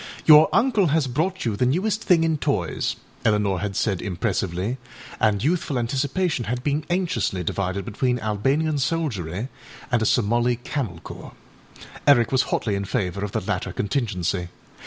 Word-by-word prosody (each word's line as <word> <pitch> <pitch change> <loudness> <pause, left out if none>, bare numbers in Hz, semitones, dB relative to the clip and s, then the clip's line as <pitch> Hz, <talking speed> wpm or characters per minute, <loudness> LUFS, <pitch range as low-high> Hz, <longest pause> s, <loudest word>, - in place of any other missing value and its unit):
âYour 155 0 +8
uncle 220 -6 +3
has 155 -1 +2
brought 160 +8 -1
you 110 -3 0
the 115 - 0
newest 190 - +1
thing 170 -3 +4
in 165 -1 +2
toys,â 140 - -1 0.3
Eleanor 105 -3 +2
had 100 +1 -3
said 95 -4 0
impressively, 95 +3 -2 0.4
and 105 -2 +2
youthful 155 -3 0
anticipation 135 +4 -1
had 125 +3 -3
been 145 +2 0
anxiously 165 - 0
divided 95 +2 -2
between 125 +4 0
Albanian 135 +8 0
soldiery 125 - -2 0.4
and 120 -2 +2
a - - +1
Somali 120 +2 +2
camel 120 - -4
corps. - - -10 0.7
Eric 120 -5 +5
was 130 -1 +4
hotly 110 -2 0
in 100 0 -2
favour 95 0 -2
of 105 - -3
the - - 0
latter - - -2
contingency. 100 -6 -1
120 Hz, 155 wpm, -23 LUFS, 100-150 Hz, 0.7 s, âYour